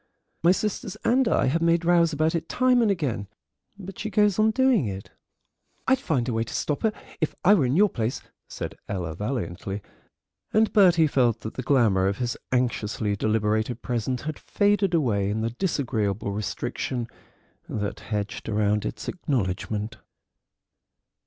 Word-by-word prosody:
My 170 - +5
sisters 200 0 -2
and 255 +1 +3
I - - +2
have 160 +6 +1
made 170 0 +2
rows 170 -1 +4
about 155 +1 +1
it 165 -1 -3
time 255 -1 +3
and 225 - +3
again, 140 - -1 0.5
but 195 -1 -9
she 215 - -3
goes 210 0 +2
on 215 +1 +5
doing 250 - +3
it." 95 -1 -6 0.8
"I'd 265 -1 +4
find 150 - 0
some 125 - -2
way 115 0 +1
to 115 - -7
stop 150 - -1
her 220 - +2 0.3
if 155 - -1
I 200 - +8
were 155 -11 +3
in 130 - +1
your 205 +4 +6
place," 115 - -2 0.3
said - - -5 0.2
Ella 90 -5 -3
valiantly, 100 -2 -4 0.7
and 220 +1 +3
Bertie 175 -6 +6
felt 120 -6 +2
that 110 - -6
the - - -4
glamour 110 -8 +3
of 100 0 -1
his 120 -1 -2 0.2
anxiously 110 -4 0
deliberated 110 +2 0
present 125 +1 -2
had 155 -1 -5
faded 205 -3 +1
away 105 -10 +1
in 110 +2 -1
the 115 +1 -1
disagreeable 115 - -1
restriction 120 +3 -3 0.6
that 105 -1 -3
hedged 105 +1 -4
round 105 -1 +1
its 105 - -5
acknowledgment. 110 - -2
125 Hz, 160 wpm, -25 LUFS, 105-175 Hz, 0.8 s, I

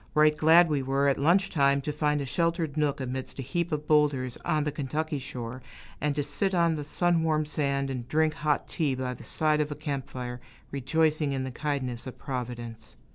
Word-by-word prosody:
Right 150 0 +5
glad 165 +3 +6
we 150 -3 0
were, 135 +1 +1
at 140 - +2
luncheon 175 +7 +3
time, 140 -3 +4
to 150 - -2
find 150 -1 0
a - - -3
sheltered 165 +1 0
nook 150 -2 +1
amidst 130 0 -4
a 135 - -4
heap 170 +6 -2
of 150 0 -3
boulders 145 -5 +2
on 155 -1 0
the 150 - -1
Kentucky 150 +2 -2
shore, 125 -1 -6 0.4
and 145 0 0
to 145 - 0
sit 190 +7 -1
on 170 -1 +3
the 150 -2 -3
sun 175 +3 +1
warmed 155 -2 +1
sand 140 -2 0
and 125 -2 -5
drink 155 +3 +2
hot 150 -1 0
tea 145 -5 0
by 130 -1 -3
the 120 - -11
side 150 +5 +2
of 150 0 -2
a - - -3
camp 140 -3 -4
fire, 125 -1 -6 0.3
rejoicing 150 +1 +1
in 135 -1 -1
the 130 - -4
kindness 130 -4 -2
of 130 - -8
Providence. 120 -3 -6
145 Hz, 210 wpm, -28 LUFS, 130-155 Hz, 0.4 s, glad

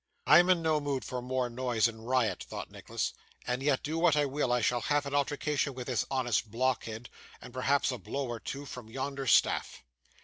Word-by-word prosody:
'I 155 - +8
am 175 +1 +4
in 180 -2 +4
no 155 -1 +2
mood 140 -2 -2
for 125 -1 -4
more 125 0 -1
noise 120 -2 +1
and 115 0 -9
riot,' 125 -3 +1
thought - - -6
Nicholas, - - -3 0.3
'and 125 +1 -1
yet, 140 -1 +1
do 160 +2 -2
what 165 -3 +4
I 145 -1 +3
will, 140 -2 -1
I 125 - +3
shall 120 +1 +1
have 145 +2 +1
an 140 - -5
altercation 145 0 0
with 125 -1 -5
this 125 -3 -1
honest 120 -4 0
blockhead, 120 -1 -1 0.3
and 125 - -12
perhaps 135 +2 +2
a 125 - -5
blow 140 -1 -3
or 120 -1 -4
two 140 +5 -6
from 125 -4 -9
yonder 135 +2 -4
staff. - - +3
130 Hz, 210 wpm, -30 LUFS, 120-145 Hz, 0.3 s, I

